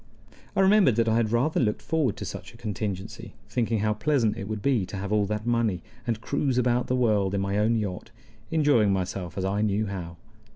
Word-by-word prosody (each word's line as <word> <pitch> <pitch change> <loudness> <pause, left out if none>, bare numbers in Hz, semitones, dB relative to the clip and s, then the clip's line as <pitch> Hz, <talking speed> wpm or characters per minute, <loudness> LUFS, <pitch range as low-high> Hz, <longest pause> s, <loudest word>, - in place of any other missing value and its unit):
I - - +3
remembered 190 - +5
that 115 0 +2
I 110 0 +3
had 110 -2 +1
rather 125 +7 +2
looked 105 -5 0
forward 150 -9 0
to - - -5
such - - -8
a - - -13
contingency, 105 0 -5
thinking 115 -3 0
how 105 0 +2
pleasant 115 -1 +1
it 100 - -6
would 110 -1 -4
be 130 -7 +2
to 100 - -6
have 100 +1 -4
all 105 -1 +2
that 105 +1 -3
money, 115 -7 0 0.2
and 115 -2 0
cruise 130 +2 -1
about 125 0 +2
the 130 - +1
world 105 -6 +2
in 100 - 0
my 100 +1 0
own 110 +2 +2
yacht, 100 -5 -3 0.4
enjoying 145 -10 +3
myself 90 -2 -3
as 95 - -1
I 100 +2 0
knew 105 0 +1
how. 90 -4 -6
110 Hz, 215 wpm, -26 LUFS, 100-120 Hz, 0.4 s, remembered